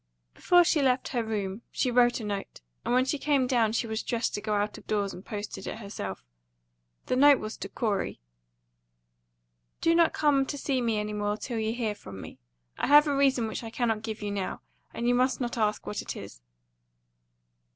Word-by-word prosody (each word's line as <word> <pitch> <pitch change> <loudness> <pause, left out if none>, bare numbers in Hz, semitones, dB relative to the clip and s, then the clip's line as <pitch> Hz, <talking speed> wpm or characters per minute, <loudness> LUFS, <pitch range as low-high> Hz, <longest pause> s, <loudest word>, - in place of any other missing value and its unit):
Before 355 -1 +5
she 320 -3 +2
left 260 -1 +2
her 240 -3 -1
room 205 -2 -3
she 250 - 0
wrote 240 0 +4
a - - -6
note, 200 - -5 0.2
and - - -2
when 255 +1 +4
she 280 +2 -1
came 280 -2 +2
down 240 -4 +2
she 235 +2 0
was 220 0 -2
dressed 235 -1 -1
to 205 - -3
go 210 0 -1
out 205 +1 -1
of - - -20
doors 205 -2 0
and 185 - -10
post 210 -1 -6
it - - -10
herself. 200 - -6 0.8
The - - 0
note 285 +1 +7
was 215 +1 -6
to - - -6
Corey: 210 -4 -2 1.6
"Do 330 - +3
not 335 -1 +4
come 280 -3 +2
to 285 - -4
see 270 -2 0
me 230 -2 0
any 210 0 -2
more 210 0 -1
till 235 0 -4
you 220 0 0
hear 225 -4 -1
from 100 - -10
me. - - -10 0.4
I - - 0
have 295 +2 +8
a 290 -2 0
reason 270 -4 +3
which 220 - -5
I 225 - -5
cannot 225 -2 -1
give 220 -1 -5
you 205 - -2
now; 195 -2 -3 0.3
and 235 - -3
you 245 - +4
must 255 +2 +2
not 245 -2 -2
ask 215 -2 0
what 210 - -3
it - - -6
is." - - -10
230 Hz, 210 wpm, -28 LUFS, 210-260 Hz, 1.6 s, have